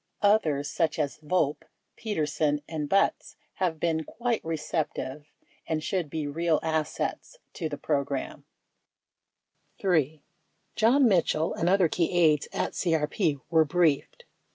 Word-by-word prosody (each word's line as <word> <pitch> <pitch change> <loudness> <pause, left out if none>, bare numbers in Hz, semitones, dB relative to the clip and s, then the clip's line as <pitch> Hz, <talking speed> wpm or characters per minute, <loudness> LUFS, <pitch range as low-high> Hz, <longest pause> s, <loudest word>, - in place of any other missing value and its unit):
Others, 155 -9 +2
such 160 -3 0
as 150 -2 -2
Volpe, 150 -2 0 0.3
Peterson, 150 -7 -1
and 155 -3 -4
Butz, 195 - +1 0.2
have 175 -4 -1
been 160 -1 0
quite 235 +5 -2
receptive 150 -3 -3 0.4
and 155 -1 -1
should 180 -5 -1
'be 155 0 -3
real 160 +2 +1
assets 160 - -2 0.2
to 160 -4 -3
the 145 - -5
program. 140 -2 -2 1.4
3. 155 -5 +1 0.5
John 250 +4 +4
Mitchell 170 -5 +2
and 170 - 0
other 190 -2 +4
key 170 +1 0
aides 155 -4 +4
at - - -2
CRP 160 -2 0
were 160 -1 +6
briefed. 155 -2 +1
160 Hz, 125 wpm, -27 LUFS, 150-180 Hz, 1.4 s, were